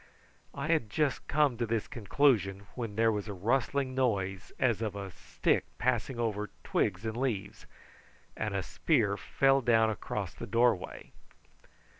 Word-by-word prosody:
I 140 Hz, +3 st, -3 dB
had 155 Hz, -10 st, +2 dB
just 145 Hz, +4 st, 0 dB
come 145 Hz, -5 st, +2 dB
to 120 Hz, -, 0 dB
this 110 Hz, -1 st, -1 dB
conclusion 105 Hz, -5 st, +1 dB
when 115 Hz, -4 st, -5 dB
there 115 Hz, +1 st, +4 dB
was 105 Hz, 0 st, -3 dB
a 105 Hz, -, -5 dB
rustling 130 Hz, +6 st, 0 dB
noise 100 Hz, -8 st, -1 dB
as 120 Hz, -4 st, +1 dB
of 105 Hz, -3 st, -2 dB
a 100 Hz, -2 st, -5 dB
stick -, -, 0 dB
passing 125 Hz, 0 st, 0 dB
over 105 Hz, -2 st, -1 dB
twigs 95 Hz, +2 st, 0 dB
and 110 Hz, 0 st, -2 dB
leaves, 120 Hz, -6 st, -3 dB, 0.7 s
and 105 Hz, -2 st, -2 dB
a 95 Hz, -, 0 dB
spear 110 Hz, -, +1 dB
fell 135 Hz, +6 st, +2 dB
down 115 Hz, -2 st, +4 dB
across 105 Hz, -, -4 dB
the -, -, -7 dB
doorway. 115 Hz, -4 st, +1 dB
115 Hz, 150 wpm, -31 LUFS, 100-130 Hz, 0.7 s, there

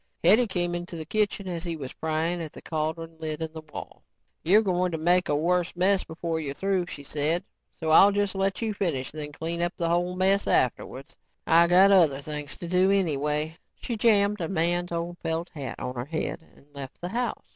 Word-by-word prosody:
Hetty 235 Hz, +3 st, +6 dB
came 175 Hz, -3 st, -1 dB
into 175 Hz, 0 st, -5 dB
the 160 Hz, -1 st, -6 dB
kitchen 205 Hz, +1 st, -1 dB
as 170 Hz, -2 st, -4 dB
he 170 Hz, -2 st, -3 dB
was 135 Hz, -4 st, -7 dB
prying 160 Hz, +2 st, -1 dB
at 160 Hz, -2 st, -7 dB
the -, -, -11 dB
cauldron 160 Hz, +1 st, -4 dB
lid 155 Hz, -1 st, -4 dB
in 160 Hz, -1 st, -4 dB
the 160 Hz, -, -7 dB
wall. -, -, -9 dB, 0.4 s
"You're 205 Hz, +7 st, +5 dB
going 180 Hz, -2 st, 0 dB
to -, -, -1 dB
make 175 Hz, +3 st, +2 dB
a 145 Hz, -, +2 dB
worse 175 Hz, +4 st, 0 dB
mess 185 Hz, +2 st, +3 dB
before 160 Hz, 0 st, -4 dB
you're 140 Hz, -3 st, -4 dB
through," 190 Hz, -1 st, 0 dB
she 145 Hz, -, -8 dB
said, 155 Hz, +5 st, -1 dB, 0.3 s
"so 160 Hz, -1 st, -3 dB
I'll 195 Hz, +5 st, +8 dB
just 205 Hz, -1 st, 0 dB
let 195 Hz, +3 st, -1 dB
you 220 Hz, -1 st, -1 dB
finish 160 Hz, -10 st, -2 dB
and 155 Hz, -, -5 dB
then 150 Hz, 0 st, -5 dB
clean 165 Hz, +3 st, -4 dB
up 175 Hz, 0 st, -1 dB
the 170 Hz, -1 st, -1 dB
whole 175 Hz, +1 st, 0 dB
mess 190 Hz, +2 st, +2 dB
afterwards. 130 Hz, +3 st, 0 dB, 0.3 s
I 170 Hz, +1 st, +5 dB
got 185 Hz, +3 st, +6 dB
other 165 Hz, -8 st, +5 dB
things 150 Hz, 0 st, -6 dB
to 175 Hz, -, -7 dB
do 185 Hz, +2 st, +3 dB
anyway." 155 Hz, -4 st, 0 dB, 0.2 s
She 235 Hz, -, -4 dB
jammed 210 Hz, -2 st, +3 dB
a 165 Hz, -, -2 dB
man's 175 Hz, 0 st, 0 dB
old 170 Hz, +1 st, -4 dB
felt 165 Hz, +2 st, -3 dB
hat 135 Hz, -6 st, -6 dB
on 125 Hz, 0 st, -4 dB
her 120 Hz, -1 st, -4 dB
head 160 Hz, +2 st, -4 dB
and -, -, -21 dB
left 140 Hz, -2 st, -9 dB
the 175 Hz, -, -5 dB
house. 240 Hz, +4 st, -3 dB
170 Hz, 215 wpm, -26 LUFS, 155-185 Hz, 0.4 s, I'll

